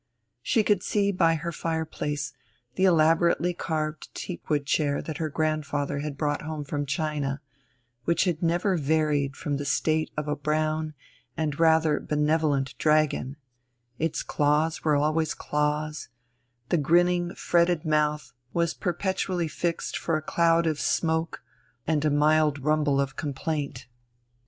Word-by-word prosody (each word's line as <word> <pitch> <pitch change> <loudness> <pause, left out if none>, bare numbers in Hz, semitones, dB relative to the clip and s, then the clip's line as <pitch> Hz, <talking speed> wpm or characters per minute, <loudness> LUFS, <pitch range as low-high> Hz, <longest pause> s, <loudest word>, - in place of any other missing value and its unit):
She 225 - +2
could 205 -3 +2
see 200 0 +1
by 165 -3 +3
her 170 +2 -4
fireplace 150 -3 -3 0.4
the 190 - +2
elaborately 170 +1 +3
carved 155 -2 -3
teakwood 150 -5 -3
chair 145 0 +1
that 155 -2 -6
her 160 -1 -1
grandfather 145 -2 -1
had 145 -1 -4
brought 145 -1 -1
home 155 -1 -5
from 145 0 -3
China, 145 -1 -2 0.7
which 170 - +2
had 175 -4 -1
never 175 +3 +1
varied 150 -2 +1
from 145 -1 -2
the 145 - -4
state 155 +2 +1
of 150 -1 -2
a 150 - 0
brown 155 +1 -1 0.4
and 155 -2 -2
rather 160 -2 +4
benevolent 150 -2 0
dragon; 150 -3 +2 0.6
its 160 0 -1
claws 150 +2 +1
were 150 -2 +3
always 155 +2 +1
claws, 150 +1 -2 0.6
the 175 - +3
grinning 175 +3 +2
fretted 170 -2 +2
mouth 150 -1 0 0.2
was 170 -1 +1
perpetually 180 -1 -1
fixed 170 +2 -2
for 165 -2 0
a - - -4
cloud 170 +1 +3
of 155 -3 0
smoke 160 +2 0 0.4
and 155 -2 +1
a 155 - +3
mild 150 0 +3
rumble 150 -2 +2
of 135 -1 -1
complaint. 145 -3 -3
155 Hz, 135 wpm, -26 LUFS, 150-165 Hz, 0.7 s, rather